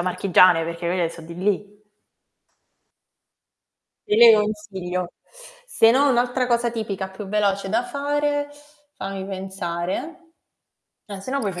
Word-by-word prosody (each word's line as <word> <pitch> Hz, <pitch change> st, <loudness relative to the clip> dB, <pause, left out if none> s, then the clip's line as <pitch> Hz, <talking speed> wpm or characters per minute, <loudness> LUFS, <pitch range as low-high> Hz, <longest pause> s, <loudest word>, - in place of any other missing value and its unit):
marchigiane, 180 Hz, -2 st, +4 dB
perché 170 Hz, +1 st, -5 dB
quelle 170 Hz, -1 st, 0 dB
so 165 Hz, -, -11 dB
di 170 Hz, +1 st, -10 dB
lì. 205 Hz, +2 st, -3 dB, 2.2 s
Te 210 Hz, -, +1 dB
le 230 Hz, 0 st, +9 dB
consiglio. 190 Hz, -4 st, -4 dB, 0.5 s
Se 225 Hz, -, +4 dB
no 275 Hz, +4 st, +4 dB
un'altra 250 Hz, 0 st, +1 dB
cosa 235 Hz, -1 st, +1 dB
tipica 205 Hz, -4 st, -4 dB
più 195 Hz, +1 st, -9 dB
veloce 200 Hz, -1 st, 0 dB
da 225 Hz, +4 st, +1 dB
fare, 290 Hz, +1 st, -1 dB, 0.5 s
fammi 195 Hz, 0 st, -5 dB
pensare, 190 Hz, -, -5 dB, 0.8 s
eh 200 Hz, -2 st, -8 dB
se 255 Hz, -, -8 dB
no 275 Hz, -, 0 dB
puoi 205 Hz, -, -1 dB
fa' 175 Hz, -, -7 dB
200 Hz, 130 wpm, -22 LUFS, 185-235 Hz, 2.2 s, le